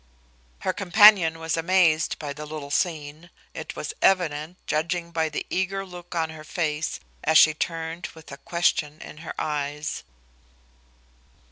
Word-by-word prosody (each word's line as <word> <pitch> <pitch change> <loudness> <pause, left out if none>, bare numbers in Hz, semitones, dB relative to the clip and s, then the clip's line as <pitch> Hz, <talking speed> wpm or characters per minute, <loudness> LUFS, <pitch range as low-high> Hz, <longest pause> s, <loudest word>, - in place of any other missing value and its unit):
Her 185 - 0
companion 195 -4 +6
was 160 0 -2
amazed 165 -1 +3
by 145 -2 -5
the 150 +1 -8
little 150 -2 -7
scene, 155 0 -2 0.2
it - - -7
was - - -5
evident, 170 -3 +2
judging 170 +2 -1
by 160 -1 0
the 155 - -4
eager 195 +1 -1
look 175 -1 -10
on 160 -1 0
her 155 -1 -10
face 155 -1 -2 0.2
as 160 - +4
she 155 - +7
turned 165 +2 -4
with 160 -3 -13
a 140 - -8
question 155 -2 0
in - - -10
her 160 +1 -7
eyes. 150 0 -3
160 Hz, 145 wpm, -25 LUFS, 155-175 Hz, 0.2 s, she